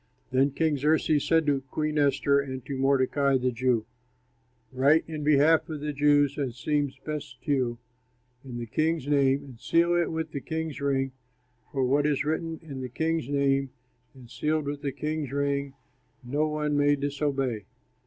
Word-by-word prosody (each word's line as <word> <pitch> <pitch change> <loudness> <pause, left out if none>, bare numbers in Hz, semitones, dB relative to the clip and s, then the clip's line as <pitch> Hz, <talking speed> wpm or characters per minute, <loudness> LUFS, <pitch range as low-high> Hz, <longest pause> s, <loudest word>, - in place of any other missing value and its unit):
Then 135 +2 +3
King 150 +1 0
Xerxes 150 +1 +2
said 165 -1 +3
to 140 -2 +1
Queen 155 +1 -1
Esther 140 0 +3
and 130 -3 -5
to 140 - -4
Mordecai, 135 +1 +2
the 125 0 0
Jew, 120 -2 +1 0.9
"Write 140 +5 +4
in 155 -2 -5
behalf 155 +3 +4
of 155 -2 -4
the 150 0 -3
Jews, 145 0 +3
as 130 -4 -3
seems 145 +1 -1
best 150 -4 -5
to 150 - -2
you, 125 -4 +1 0.7
in 125 -3 -7
the 120 - -4
king's 155 +4 0
name 140 -1 +3
and 130 -5 -13
seal 170 +6 +2
it 175 -1 +1
with 160 -1 -3
the 140 - -4
king's 160 -3 -4
ring; 135 -1 0 0.6
for 135 -2 0
what 145 +3 +2
is 145 -2 0
written 160 +1 -2
in 140 -4 -7
the 130 - -5
king's 160 +1 -1
name 140 -1 +1 0.5
and 130 -2 -13
sealed 150 +5 -1
with 145 0 -4
the 140 -2 -2
king's 150 0 -3
ring 140 -1 -1 0.5
no 145 +5 0
one 150 -1 -1
may 145 0 +4
disobey." 140 -6 -2
140 Hz, 175 wpm, -27 LUFS, 135-150 Hz, 0.9 s, Write